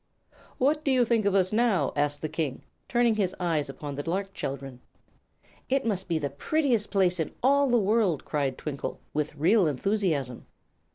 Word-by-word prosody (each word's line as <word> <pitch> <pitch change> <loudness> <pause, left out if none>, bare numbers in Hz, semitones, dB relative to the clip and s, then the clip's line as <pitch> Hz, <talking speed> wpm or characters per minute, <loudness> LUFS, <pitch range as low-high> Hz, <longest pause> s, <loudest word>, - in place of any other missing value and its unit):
"What 295 +4 +2
do 285 - 0
you 255 -2 +4
think 225 -2 +1
of 200 -1 +2
us 185 0 +2
now?" 225 -4 +2
asked 145 0 0
the - - 0
King, 155 -4 -3 0.3
turning 240 -2 +3
his 190 -4 0
eyes 160 -5 0
upon 140 +2 -6
the 145 +4 -4
lark 195 +2 -2
children. 135 -6 -5 0.9
"It 270 -1 +1
must 195 -4 -1
be 165 - 0
the 145 -3 -3
prettiest 240 - 0
place 185 -3 +2
in 160 - -2
all 280 +1 +4
the 240 - +4
world!" 205 - +1
cried 140 -3 -1
Twinkle, 145 -3 -5
with 150 0 -2
real 180 +5 +3
enthusiasm. 150 - -1
185 Hz, 175 wpm, -27 LUFS, 145-225 Hz, 0.9 s, you